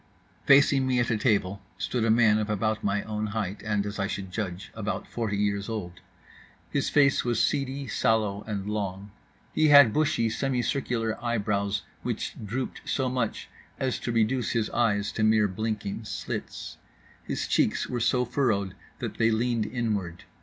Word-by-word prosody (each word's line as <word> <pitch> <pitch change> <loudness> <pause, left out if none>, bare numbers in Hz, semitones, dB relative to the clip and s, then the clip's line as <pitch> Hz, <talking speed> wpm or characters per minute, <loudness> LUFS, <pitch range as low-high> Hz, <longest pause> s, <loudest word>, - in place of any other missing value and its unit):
Facing 135 -1 +6
me 125 -1 +2
at 120 0 +1
a 110 - +2
table 100 -4 +1 0.2
stood 120 -3 -1
a 115 - +2
man 110 -1 +5
of 105 0 -2
about 110 +1 0
my 100 0 0
own 110 0 -3
height, 105 -2 -3
and, 105 -2 0
as 105 0 -5
I 100 - 0
should 100 -2 -5
judge, 95 -2 -4
about 110 -1 -4
forty 110 -4 -2
years 100 0 0
old. 90 -6 -5 0.7
His - - 0
face 140 -2 +4
was 120 -2 0
seedy 140 +2 0
sallow 110 -3 +1
and 100 -2 -3
long. 100 -1 -3 0.4
He 155 - +3
had 140 -6 +8
bushy 140 -7 +2
semi 130 +1 0
circular 115 -3 -1
eyebrows 100 -3 0 0.2
which - - -3
drooped 120 +5 -4
so 130 -2 -1
much 125 -3 -2 0.3
as 130 -2 -1
to 120 - -3
reduce 115 +1 +1
his 115 -3 0
eyes 105 -4 +1
to 110 - -2
mere 110 -1 +4
blinking 110 +1 -3
slits. - - -5 0.5
His - - -3
cheeks - - +1
were 125 - -2
so 125 +2 +2
furrowed 110 -7 0 0.2
that - - -5
they 115 - +4
leaned 115 -1 0
inward. 105 -8 -2
110 Hz, 165 wpm, -27 LUFS, 100-120 Hz, 0.7 s, had